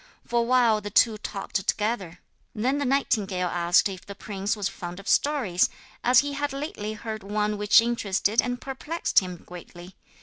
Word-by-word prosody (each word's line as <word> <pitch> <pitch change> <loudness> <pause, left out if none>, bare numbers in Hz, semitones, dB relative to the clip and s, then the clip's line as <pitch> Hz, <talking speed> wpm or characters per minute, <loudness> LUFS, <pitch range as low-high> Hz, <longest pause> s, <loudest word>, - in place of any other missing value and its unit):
For 240 - 0
a - - +2
while 235 -3 +3
the 205 - -5
two 215 +1 +3
talked 200 -1 -4
together: 205 -6 -1 0.3
then 255 +6 0
the 285 - -1
nightingale 205 -9 0
asked 175 +2 +3
if 190 -2 -8
the 200 - -9
prince 200 0 -3
was 200 -2 -1
fond 175 0 -7
of 195 - -12
stories, 250 -12 +2 0.3
as 250 +1 +6
he 285 0 -4
had 285 0 -2
lately 275 -7 -4
heard 215 0 -6
one 210 +1 -1
which 210 +2 +5
interested 220 -2 +1
and 245 0 -3
perplexed 295 +6 0
him 180 -2 -6
greatly. 175 +1 -11
210 Hz, 175 wpm, -26 LUFS, 195-245 Hz, 0.3 s, as